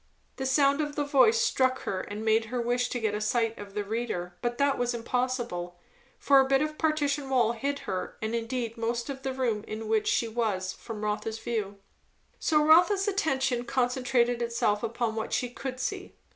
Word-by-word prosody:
The 265 - -2
sound 280 +2 +3
of 295 -1 -3
the 295 - 0
voice 290 - +4
struck 260 - +1
her 185 -1 -2
and 210 +2 -6
made 220 0 +3
her 245 +3 -3
wish 245 +1 0
to 245 - -2
get 220 -2 0
a 210 - -2
sight 225 +1 +1
of 200 -1 -10
the 210 - -1
reader; 205 -5 -3
but 240 0 -2
that 280 -1 +2
was 245 0 0
impossible, 235 -7 -2 0.4
for 275 -1 +5
a 265 - +4
bit 270 +1 +3
of 305 0 -4
partition 295 -3 0
wall 245 -4 +3
hid 275 +5 -2
her 185 -1 -4
and 220 +1 -3
indeed 235 0 -3
most 235 +3 -2
of 270 -1 -8
the 265 - -2
room 240 -5 -1
in 220 0 -5
which 220 -1 +1
she 230 - +2
was 215 -5 -1
from 215 -2 -8
Rotha's 210 +1 -2
view. 215 -4 -3 0.6
So 300 -1 +3
Rotha's 360 +6 +5
attention 265 -11 0
concentrated 245 -1 +1
itself 235 -3 0
upon 230 0 -1
what 220 - -3
she 250 -1 0
could 255 0 -6
see. 380 +8 -4
240 Hz, 195 wpm, -28 LUFS, 220-270 Hz, 0.6 s, for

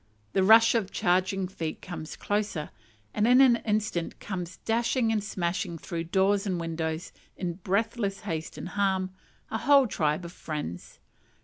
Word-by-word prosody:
The 190 - +3
rush 225 +3 +7
of 220 -5 0
charging 185 +1 +1
feet 165 -4 -5
comes 170 -3 -7
closer, 205 -7 -2 0.4
and 210 - +2
in 250 +1 +6
an 255 -3 +7
instant 210 -6 -2
comes 180 -3 -5
dashing 230 +1 +1
and 215 -2 0
smashing 185 -2 -2
through 165 0 -5
doors 195 +3 +2
and 180 -3 -1
windows, 160 0 -3 0.3
in 180 -2 -2
breathless 200 0 0
haste 160 -6 -4
and - - -6
alarm, 190 -1 0 0.4
a 220 - -1
whole 280 +1 +6
tribe 160 -5 0
of 170 - -7
friends. 150 - -6
190 Hz, 150 wpm, -28 LUFS, 170-215 Hz, 0.4 s, rush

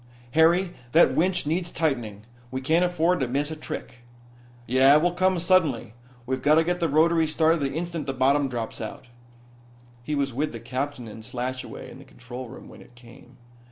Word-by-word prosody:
"Harry, 170 +4 +3 0.2
that 170 - +6
winch 180 0 +1
needs 170 +3 -1
tightening. 120 -12 -2 0.3
We 130 - -4
can't 160 +6 +2
afford 175 0 +1
to 130 - 0
miss 140 +5 -1
a - - -4
trick." 155 -5 -7 0.7
"Yeah, 130 +4 +5
it 150 - +5
will 175 - +3
come 185 +1 +1
suddenly. 165 - +2 0.3
We've 130 +1 -2
got 150 +3 +4
to 160 - +4
get 175 +1 -1
the 165 -2 0
rotaries 160 +1 +3
started 160 +1 +3
the 140 -2 -1
instant 170 -2 -4
the 135 - -1
bottom 135 +2 +2
drops 115 -3 -5
out." 110 +2 -8 0.9
He 150 +5 -3
was 140 -2 -1
with 145 +3 -2
the 115 - -6
captain 130 +1 -4
and 110 +1 -10
Slashaway 130 +2 -6
in - - -12
the - - -12
control 125 0 -9
room 130 - -11
when - - -14
it 120 - -18
came. 120 +1 -17
145 Hz, 190 wpm, -25 LUFS, 125-165 Hz, 0.9 s, that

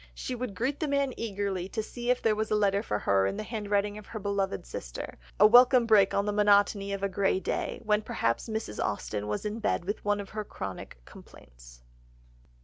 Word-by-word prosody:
She 255 - -4
would 245 -4 -4
greet 270 +5 -1
the 310 - -1
man 280 -2 0
eagerly 200 -4 -3
to 220 0 -3
see 240 +2 -6
if 250 - +2
there 220 -2 +3
was 215 0 -2
a - - +2
letter 200 -1 +2
for 105 - -2
her 95 -1 +2
in 95 - -3
the - - -3
handwriting 210 -2 -1
of 210 - -14
her 225 - -7
beloved 200 - -2
sister,—a - - -2
welcome 245 +2 +7
break 210 -4 +5
on 200 - 0
the 210 - -1
monotony 205 -1 +3
of 200 0 -4
a - - +3
grey 195 0 +1
day, - - -3
when 210 -1 +2
perhaps 115 - -1
Mrs. 220 - -3
Austen 105 0 -3
was 105 - -3
in 210 +2 -3
bed 210 - -1
with 205 +3 -3
one 205 0 +1
of 200 - -7
her 215 0 -4
chronic 95 - -7
complaints. - - -16
205 Hz, 210 wpm, -29 LUFS, 190-220 Hz, -, welcome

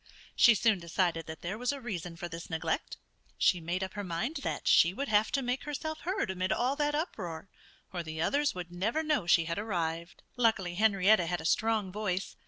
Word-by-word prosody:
She 235 - +7
soon 215 -2 +3
decided 170 -1 -1
that 160 0 -8
there 195 +5 -4
was 250 +1 0
a 285 - -5
reason 180 -9 -5
for 175 - -5
this 165 0 -8
neglect. 160 0 -2 0.4
She 180 -3 +3
made 175 +3 -2
up 190 - -5
her 205 - -4
mind 200 - -2
that 280 - -4
she 170 +3 +5
would 280 +4 -3
have 210 0 +3
to 275 - +1
make 250 +2 -2
herself 310 +2 -4
heard 370 - -1
amid 185 0 -2
all 255 +3 +1
that 295 -1 +1
uproar 190 - -4 0.4
or 175 - -2
the 160 -1 -7
others 285 - +1
would 175 -1 -6
never 215 - -1
know 300 - 0
she 170 -1 +5
had 170 +3 -2
arrived. 170 -5 -3
Luckily 220 -7 +1
Henrietta 195 -2 +4
had 175 0 -1
a 160 - -8
strong 215 +1 +1
voice. 195 -2 -3
190 Hz, 205 wpm, -30 LUFS, 170-240 Hz, 0.4 s, She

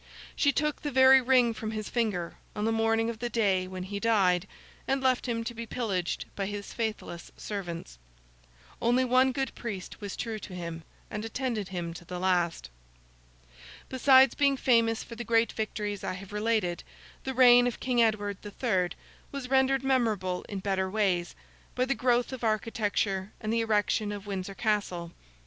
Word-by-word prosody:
She 285 - +3
took 300 +1 -1
the 295 - -2
very 265 0 +7
ring 250 -2 +4
from 220 -1 -5
his 215 -1 -4
finger 205 -8 -1 0.2
on 210 0 -1
the 225 - +2
morning 225 0 +2
of 230 -1 -4
the 240 0 -2
day 195 -5 +1
when 185 0 -6
he 200 +2 -5
died, 200 -5 +2 0.4
and 270 0 +1
left 260 -1 +1
him 230 -1 -1
to 240 - -4
be 230 0 -7
pillaged 195 -8 -2
by 195 -1 -2
his 205 0 -6
faithless 215 -6 -4
servants. 170 - -6 0.8
Only 245 +2 +3
one 255 +1 +4
good 270 +1 -2
priest 210 -3 -6
was 205 -2 -5
true 225 -2 -4
to 185 - -9
him, 170 -2 -5 0.3
and 210 0 -4
attended 225 -3 -2
him 175 -3 -4
to 170 - -10
the 180 +1 -6
last. 175 - 0 1.2
Besides 260 0 +6
being 280 -1 +2
famous 230 -3 +3
for - - -10
the 235 +1 -5
great 230 -1 +2
victories 210 -2 -3
I - - -2
have 195 +2 -9
related, 210 -5 0 0.4
the 265 -1 -4
reign 245 -1 +7
of 245 - -3
King 250 -2 +1
Edward 205 -3 +1
the 205 - -7
Third 190 -6 0 0.4
was 270 -2 -6
rendered 265 0 +3
memorable 220 -9 +1
in 200 -2 -4
better 190 -1 0
ways, 185 -4 0 0.4
by 255 - +2
the 270 - +1
growth 245 +1 +1
of 255 - -7
architecture 210 -3 -1
and 215 -1 -2
the 230 - +2
erection 210 -1 +1
of 205 -1 -6
Windsor 195 -1 -4
Castle. 195 -6 -1
220 Hz, 175 wpm, -29 LUFS, 190-245 Hz, 1.2 s, very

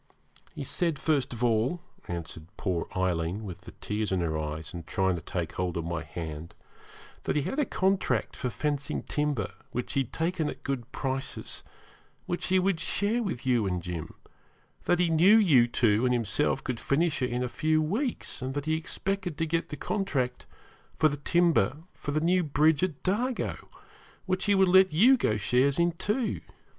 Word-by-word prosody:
'He - - -4
said, 170 -5 -1
first 140 -2 +1
of 120 0 -4
all,' 120 +8 +2 0.3
answered 80 -2 -6
poor 90 -4 -1
Aileen, 90 +2 0
with 95 -5 -7
the - - -11
tears 105 0 -3
in 95 - +1
her 80 -2 -1
eyes, 75 +1 -4
and 85 -2 -7
trying 95 -1 +1
to 85 - -5
take 85 0 -3
hold 90 -2 -2
of 85 - -2
my 85 -1 -2
hand, 80 0 -7 0.7
'that - - -1
he 150 - +2
had 270 - -2
a 295 - +3
contract 190 -3 0
for 125 - -2
fencing 145 +2 -2
timber, 145 -9 -1 0.2
which 125 - -4
he - - +2
had 130 -2 -2
taken 165 -2 -1
at - - -8
good 135 -3 -3
prices, 135 -1 -3 0.6
which 175 - -2
he 185 - +3
would 185 -2 +2
share 210 +8 0
with 175 - -3
you 120 -5 +2
and 90 -2 -2
Jim; 85 -3 -5 0.7
that 175 - +3
he 180 0 +3
knew 170 +7 +6
you 145 - +5
two 115 -2 +2
and 125 -1 +3
himself 120 +5 0
could 125 -4 -3
finish 155 +1 +1
it 125 - +1
in 125 +1 -1
a - - -1
few 155 +5 +1
weeks, 210 - -2
and 130 +1 -3
that 145 0 -2
he 155 0 +1
expected 180 +1 -3
to 165 - +1
get 165 +1 -1
the 150 - -5
contract 140 -13 -2 0.5
for 155 - +4
the 145 - -4
timber 155 - +2 0.2
for - - -7
the 150 +1 +1
new 180 +3 +3
bridge 150 -1 +3
at 180 -6 -2
Dargo, 235 +7 -1 0.6
which 185 0 0
he 205 -1 +4
would 190 -1 +5
let 190 0 +6
you 225 +13 +6
go 110 - +1
shares 125 +8 +2
in 170 0 +3
too. 210 +8 -1
140 Hz, 190 wpm, -28 LUFS, 105-175 Hz, 0.7 s, knew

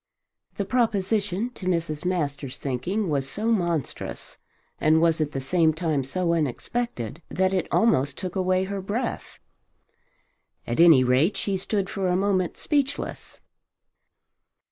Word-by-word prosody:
The 200 - -2
proposition 210 -1 0
to 190 -6 -8
Mrs. 165 -3 -1
Masters' 145 -7 -2
thinking 175 - -2
was 140 -4 -1
so 215 +12 -1
monstrous, 170 - -2 0.4
and 155 +1 +4
was 165 -1 +3
at 150 -1 -1
the 135 - -3
same 160 +3 +2
time 155 -4 0
so 170 +6 -1
unexpected, 155 - -2
that 185 +1 +1
it 185 - 0
almost 140 - +2
took 185 0 -5
away 185 0 +2
her 195 0 -4
breath. 225 +6 -4 1.3
At 120 - -3
any 165 -6 +8
rate 130 +9 +3
she 200 - -1
stood 195 +1 -1
for 190 0 -2
a 180 - +2
moment 185 -2 0
speechless. 285 -2 -2
180 Hz, 135 wpm, -25 LUFS, 150-200 Hz, 1.3 s, any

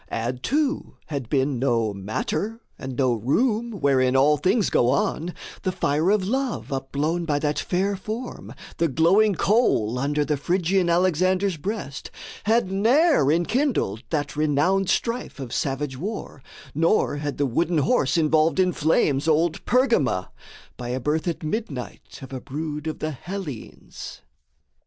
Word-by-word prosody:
Add, 120 +2 -3
too, 290 - -1
had 140 -6 -4
been 135 -2 +1
no 115 -5 +1
matter, 110 - -3 0.2
and 130 -1 -6
no 130 -3 +3
room 215 - +1
Wherein 135 -7 +2
all 145 +3 +5
things 190 - +1
go 120 - +3
on, 155 +5 0 0.3
the 185 - -1
fire 155 0 +1
of 200 -2 +2
love 260 - -2
Upblown 145 +6 -1
by 150 -3 +1
that 150 0 -1
fair 195 +3 0
form, 220 +6 -6 0.3
the 170 - +2
glowing 185 +8 +3
coal 155 - +2
Under 145 +2 0
the 150 0 0
Phrygian 180 +3 +1
Alexander's 185 +2 +2
breast, 190 -3 -5 0.4
Had 220 -3 +2
ne'er 230 - +4
enkindled 175 - 0
that 145 -3 -2
renowned 155 +6 +2
strife 235 -8 -1
Of 130 -4 -6
savage 135 0 -2
war, 200 -6 -5 0.3
nor 165 0 +2
had 145 -1 -4
the 145 - +1
wooden 165 +7 0
horse 140 0 +2
Involved 160 +2 +3
in 185 -1 +3
flames 150 -2 +1
old 160 +1 +2
Pergama, 230 - +2 0.5
by 120 -1 -6
a 125 +1 -1
birth 150 +6 -1
At 170 -1 -2
midnight 155 - -5
of 135 - -9
a 130 - -5
brood 150 +1 -5
of 155 - -3
the 155 - -3
Hellenes. 165 - -8
155 Hz, 145 wpm, -24 LUFS, 135-195 Hz, 0.5 s, all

